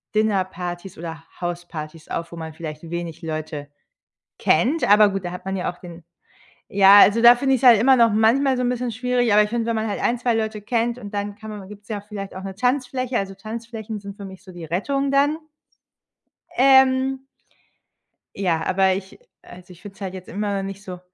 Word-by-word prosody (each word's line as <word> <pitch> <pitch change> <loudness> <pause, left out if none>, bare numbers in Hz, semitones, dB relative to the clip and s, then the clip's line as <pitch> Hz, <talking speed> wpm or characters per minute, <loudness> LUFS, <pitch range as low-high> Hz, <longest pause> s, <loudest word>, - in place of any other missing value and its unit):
Dinnerpartys 185 -4 -2
oder 165 -1 -7 0.2
Hauspartys 170 -3 -6
auf, 170 0 -4
wo - - -8
man 160 -1 -7
vielleicht 155 0 -8
wenig 170 -2 -5
Leute 155 -2 -5 0.7
kennt. 260 - +2
Aber 210 0 +7
gut, 195 -2 -4
da 175 - -4
hat 180 - -9
man 190 0 -2
ja 180 - -2
auch 175 - -19
den 170 -2 -11 0.7
ja, 200 +1 +8
also, 210 +3 +6
da 240 +1 +9
finde 270 +2 +1
ich's 265 - -1
halt 240 -4 +8
immer 265 +3 +5
noch 230 -3 +4
manchmal 255 +5 +3
so 250 - -1
'n 245 - +1
bisschen 250 -1 -2
schwierig. 245 0 0
Aber 210 - +7
ich 210 - -6
finde, 235 0 -1
wenn 230 -1 0
man 220 0 -1
halt 205 - -3
ein, 240 - +1
2 245 0 0
Leute 220 -1 -2
kennt 235 +2 -1
und 205 -4 -9
dann 205 0 -3
kann 220 0 -9
man 205 -3 -8
gibt's 205 0 -13
ja 210 -2 -4
auch 205 - -23
vielleicht 200 -2 -7
auch 190 - -7
'ne 195 0 -6
Tanzfläche. 255 +2 -1
Also, 195 0 -4
Tanzflächen 220 +1 -7
sind 200 0 -9
für 200 - -9
mich 190 -1 -11
so 185 - -12
die 175 -2 -9
Rettung 275 - -1
dann. 285 +2 +3 1.2
Ähm. 265 0 +4 1.1
Ja, 170 -5 0
aber 190 0 +2
ich 190 0 -6
äh, - - -16 0.3
also, 180 +1 -14
ich 175 -1 -15
finde 200 -1 -11
es - - -21
halt 190 -2 -4
jetzt 185 -1 -9
immer 205 0 -2
noch 195 - -3
nicht 195 +1 -8
so 180 -3 -8
205 Hz, 215 wpm, -22 LUFS, 180-235 Hz, 1.2 s, da